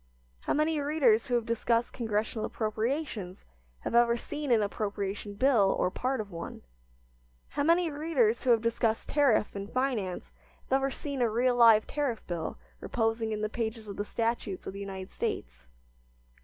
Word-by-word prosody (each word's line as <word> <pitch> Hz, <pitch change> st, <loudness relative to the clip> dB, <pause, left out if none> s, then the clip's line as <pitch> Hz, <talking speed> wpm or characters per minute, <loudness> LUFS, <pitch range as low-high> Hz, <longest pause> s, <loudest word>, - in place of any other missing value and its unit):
How -, -, -1 dB
many 305 Hz, +1 st, +1 dB
readers 280 Hz, -7 st, +3 dB
who 245 Hz, -, +1 dB
have 235 Hz, -2 st, +1 dB
discussed 230 Hz, 0 st, 0 dB
Congressional 220 Hz, -1 st, -2 dB
appropriations 220 Hz, -, -3 dB, 0.4 s
have -, -, -4 dB
ever 235 Hz, 0 st, +5 dB
seen 295 Hz, +2 st, -4 dB
an 225 Hz, -3 st, +5 dB
appropriation 200 Hz, 0 st, -3 dB
bill 225 Hz, -4 st, +4 dB
or 180 Hz, -, +1 dB
part 260 Hz, +4 st, -1 dB
of 205 Hz, -2 st, -5 dB
one? 170 Hz, -1 st, -7 dB, 0.9 s
How -, -, -2 dB
many 335 Hz, +2 st, +3 dB
readers 285 Hz, -7 st, +1 dB
who 260 Hz, -, -1 dB
have 230 Hz, -2 st, +4 dB
discussed 230 Hz, -1 st, 0 dB
tariff 275 Hz, -9 st, +3 dB
and 200 Hz, +1 st, -6 dB
finance 245 Hz, -9 st, -1 dB, 0.3 s
have 265 Hz, -, +2 dB
ever 270 Hz, 0 st, 0 dB
seen 280 Hz, -1 st, -4 dB
a 235 Hz, -, +3 dB
real 245 Hz, +3 st, +2 dB
live 225 Hz, -3 st, +7 dB
tariff 280 Hz, -6 st, -2 dB
bill 170 Hz, -2 st, -4 dB, 0.2 s
reposing 225 Hz, -1 st, -1 dB
in 210 Hz, -1 st, -2 dB
the 215 Hz, -, +1 dB
pages 220 Hz, 0 st, -4 dB
of 200 Hz, -, -6 dB
the 205 Hz, -, -1 dB
statutes 225 Hz, -3 st, -2 dB
of -, -, -5 dB
the 200 Hz, -, -7 dB
United 190 Hz, -1 st, -6 dB
States? -, -, -4 dB
230 Hz, 170 wpm, -29 LUFS, 210-260 Hz, 0.9 s, live